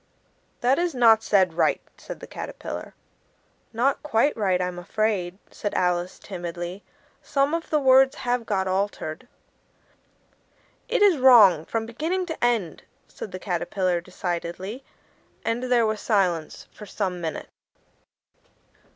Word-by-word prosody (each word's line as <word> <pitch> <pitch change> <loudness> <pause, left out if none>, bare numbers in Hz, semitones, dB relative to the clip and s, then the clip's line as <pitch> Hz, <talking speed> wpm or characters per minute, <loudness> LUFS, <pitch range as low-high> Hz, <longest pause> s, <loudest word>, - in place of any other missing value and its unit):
"That 255 +4 +3
is 345 -4 -1
not 225 -3 +6
said 190 -6 +2
right," 165 - +2 0.2
said - - -10
the - - -7
Caterpillar. - - -7 0.8
"Not 250 +4 +1
quite 290 -1 +1
right, 190 -5 +1
I'm 180 -1 -3
afraid," 190 -1 -1
said 205 - -4
Alice 180 0 0
timidly; 175 0 -6 0.4
"some 275 +2 0
of 335 0 -3
the 305 - +2
words 265 -1 +5
have 245 -1 -1
got 190 -3 0
altered." 190 +1 -3 1.6
"It 460 -3 +2
is 375 -8 +5
wrong 210 -11 +7
from 225 +3 -2
beginning 320 +11 -2
to 320 -6 -6
end," 225 -9 0 0.3
said 205 - -9
the 185 - -5
Caterpillar 180 -1 -1
decidedly, 180 +6 -5 0.6
and 230 +1 0
there 240 -2 +4
was 215 -1 -2
silence 180 -7 0
for 210 - -12
some 185 -4 -3
minutes. 160 -2 -5
210 Hz, 130 wpm, -24 LUFS, 180-250 Hz, 1.6 s, wrong